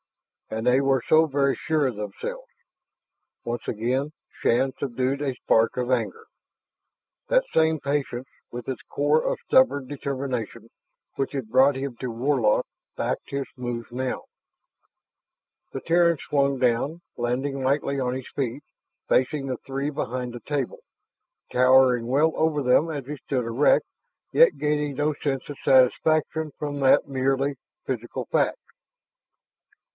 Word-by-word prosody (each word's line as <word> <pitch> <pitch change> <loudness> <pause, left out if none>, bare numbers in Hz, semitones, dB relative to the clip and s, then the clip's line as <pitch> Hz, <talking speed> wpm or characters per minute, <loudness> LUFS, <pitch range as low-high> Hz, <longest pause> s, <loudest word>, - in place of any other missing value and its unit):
And 110 +1 -4
they 125 +2 +5
were 135 -3 +2
so 160 +1 +5
very 140 -1 +1
sure 155 -3 0
of 125 - -3
themselves.... 480 - -6 1.0
Once 120 0 -4
again 125 +6 -1 0.3
Shann 130 +3 +2
subdued 130 +1 -1
a 135 -3 -1
spark 115 -1 +2
of 125 0 -1
anger. 120 -4 -1 1.0
That - - +3
same 160 -1 +3
patience 140 -2 -2 0.2
with 120 -1 -7
its 130 -3 -4
core 150 +2 +2
of - - -1
stubborn 190 - +3
determination 130 -5 -4 0.5
which 135 - -2
had 135 -6 -4
brought 130 +3 +5
him 135 -1 -4
to 125 - -4
Warlock 120 -2 +1 0.3
backed - - -2
his 140 -1 -2
moves 120 -2 -5
now. 130 +1 -3 1.5
The 135 - -5
Terran 170 0 +3
swung 140 -1 0
down, 130 +6 0
landing 130 +3 -2
lightly 140 +1 0
on 125 -1 -1
his 130 -1 -6
feet, 135 +1 -3 0.4
facing 135 +2 +1
the 130 -2 -2
three 135 +4 -4
behind 125 -4 -4
the 120 - -8
table, 145 -4 -3 0.7
towering 125 -1 +5
well 150 +5 +3
over 155 -2 +1
them 130 +6 +3
as 145 -5 -4
he 150 +2 -6
stood 130 -1 -2
erect, 130 - +3 0.5
yet - - +6
gaining 150 -1 -1
no 150 +2 +1
sense 140 -2 -3
of 145 - -8
satisfaction 155 +4 +3
from 145 -1 -4
that 135 +1 +4
merely 135 +1 0 0.3
physical - - -4
fact. - - +2
135 Hz, 140 wpm, -25 LUFS, 125-145 Hz, 1.5 s, yet